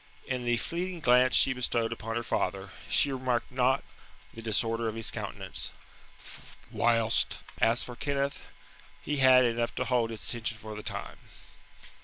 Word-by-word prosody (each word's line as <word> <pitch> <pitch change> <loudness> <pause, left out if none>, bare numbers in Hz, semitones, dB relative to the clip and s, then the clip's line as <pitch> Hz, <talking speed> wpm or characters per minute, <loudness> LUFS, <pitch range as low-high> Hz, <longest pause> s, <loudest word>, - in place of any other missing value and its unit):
In 125 -2 -3
the 120 0 +2
fleeting 175 +6 -3
glance 125 -1 +5
she 135 - +6
bestowed 120 -2 -1
upon 115 0 -5
her 120 - -1
father, 95 -3 -2 0.2
she 140 - +3
remarked 130 -2 -1
not 130 +1 +2 0.5
the 115 - -9
disorder 115 +1 0
of 110 - -3
his 115 -1 0
countenance; - - -5 1.0
whilst 115 -1 +2 0.2
as 115 +2 +4
for 125 - -7
Kenneth, 140 +1 -2 0.6
he 150 0 -2
had 130 -1 +6
enough 115 0 -1
to - - -1
hold 120 -3 +1
his 110 -2 -6
attention 115 -2 -1
for 110 -1 -8
the 105 - -6
time. - - -6
120 Hz, 155 wpm, -29 LUFS, 115-130 Hz, 1.0 s, she